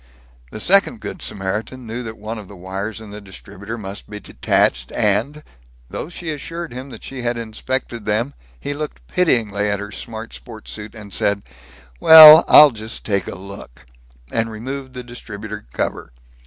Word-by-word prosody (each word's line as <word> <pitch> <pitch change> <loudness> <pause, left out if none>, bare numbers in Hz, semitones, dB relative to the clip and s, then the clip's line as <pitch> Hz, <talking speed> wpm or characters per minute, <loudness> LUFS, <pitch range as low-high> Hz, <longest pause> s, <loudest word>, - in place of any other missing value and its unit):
The 110 - -8
second 200 - +3
Good 190 - -7
Samaritan 105 +6 -3
knew 115 +2 -5
that 110 -2 -7
one 110 +2 -6
of 105 - -11
the 100 - -12
wires 95 +4 -5
in 110 -2 -11
the 105 +1 -9
distributor 100 +3 -9
must 100 -2 -8
be 105 0 -7
detached 65 -8 0
and, 120 +8 0 0.5
though - - -5
she 170 -2 -5
assured 165 +1 -6
him 130 +2 -7
that - - -11
she 135 -2 -7
had 120 0 -1
inspected 115 +1 -4
them, 115 +6 -1 0.3
he 145 - -4
looked 150 +1 -7
pityingly 110 - +1
at 100 -1 -1
her 105 0 -7
smart 110 +2 -7
sports 110 -3 -11
suit, 105 +1 -8 0.2
said, 100 0 0 0.6
"Well, 160 - +11
I'll 150 -1 +9
just 110 0 -7
take 100 -2 -1
a - - -6
look," 95 -11 -11 0.5
and 115 0 0
removed 130 +4 -7
the 125 -1 -7
distributor 105 - -9
cover. - - -4
110 Hz, 170 wpm, -20 LUFS, 105-130 Hz, 0.6 s, Well